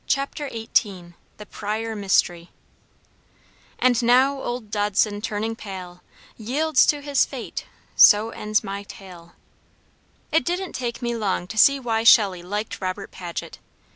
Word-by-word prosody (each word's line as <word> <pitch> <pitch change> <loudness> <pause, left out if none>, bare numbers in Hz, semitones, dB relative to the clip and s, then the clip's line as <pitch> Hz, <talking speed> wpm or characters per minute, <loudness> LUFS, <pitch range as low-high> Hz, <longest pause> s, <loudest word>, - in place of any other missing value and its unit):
CHAPTER 275 +1 -2
XVIII 200 -6 -2 0.2
The 210 - -10
Pryor 220 +2 -4
Mystery 175 -4 0 1.3
"And 250 -2 +2
now 260 +3 +3
old 240 -4 -5
Dodson, 205 0 0
turning 220 +1 -3
pale, 185 -4 -9 0.4
Yields 275 +6 +2
to 295 -1 +1
his 285 -1 +2
fate - - -7 0.3
so 215 +2 +6
ends 215 -1 -1
my 200 +1 -5
tale." 180 -4 -13 1.0
It 320 - +3
didn't 360 +2 -3
take 240 -1 -4
me 235 0 -1
long 200 -5 -2
to 210 +5 -9
see 275 +5 +5
why 225 -3 -1
Shelley 200 -5 +5
liked 205 +5 -5
Robert 185 +2 -4
Paget. 175 -2 -7
215 Hz, 135 wpm, -23 LUFS, 195-245 Hz, 1.3 s, so